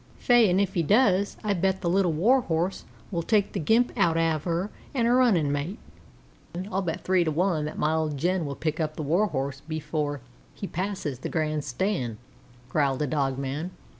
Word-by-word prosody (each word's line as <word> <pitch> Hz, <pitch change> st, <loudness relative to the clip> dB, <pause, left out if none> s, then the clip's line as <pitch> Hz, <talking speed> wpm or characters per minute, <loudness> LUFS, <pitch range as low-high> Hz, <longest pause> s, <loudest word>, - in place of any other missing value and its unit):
"Faix, 240 Hz, -4 st, +5 dB
an' 180 Hz, +2 st, +3 dB
if 200 Hz, -1 st, 0 dB
he 170 Hz, -, +1 dB
does 200 Hz, -, +3 dB
I 210 Hz, -1 st, +1 dB
bet 190 Hz, +1 st, 0 dB
the 180 Hz, -, -2 dB
Little 180 Hz, 0 st, +3 dB
Warhorse 180 Hz, -1 st, +1 dB, 0.3 s
will 170 Hz, -3 st, -1 dB
take 205 Hz, +3 st, +1 dB
the -, -, -2 dB
gimp 225 Hz, +10 st, +3 dB
out 165 Hz, -1 st, +2 dB
av 165 Hz, -2 st, +1 dB
her 175 Hz, +4 st, -1 dB, 0.2 s
an' 235 Hz, -3 st, +2 dB
her 240 Hz, +1 st, +4 dB
runnin' 190 Hz, -, +3 dB
mate." 145 Hz, +8 st, -2 dB, 0.9 s
"I'll 190 Hz, +1 st, 0 dB
bet 165 Hz, -3 st, -3 dB
three 185 Hz, -1 st, +3 dB
to 165 Hz, -, 0 dB
one 160 Hz, -1 st, +1 dB
that 155 Hz, -, -6 dB
my 155 Hz, +1 st, +1 dB
old 155 Hz, -2 st, -1 dB
Jen 180 Hz, +4 st, 0 dB
will 140 Hz, -, -4 dB
pick 155 Hz, +1 st, -2 dB
the 155 Hz, -1 st, -2 dB
Warhorse 145 Hz, -5 st, 0 dB
up -, -, -29 dB
before 155 Hz, -2 st, -2 dB, 0.4 s
he -, -, -5 dB
passes 185 Hz, -8 st, -3 dB
the -, -, -4 dB
grand 155 Hz, -2 st, -1 dB
stand," 130 Hz, -, -2 dB, 0.5 s
growled 140 Hz, +1 st, +1 dB
a -, -, +1 dB
dog 135 Hz, -2 st, 0 dB
man. 140 Hz, +5 st, -3 dB
165 Hz, 195 wpm, -26 LUFS, 150-195 Hz, 0.9 s, Faix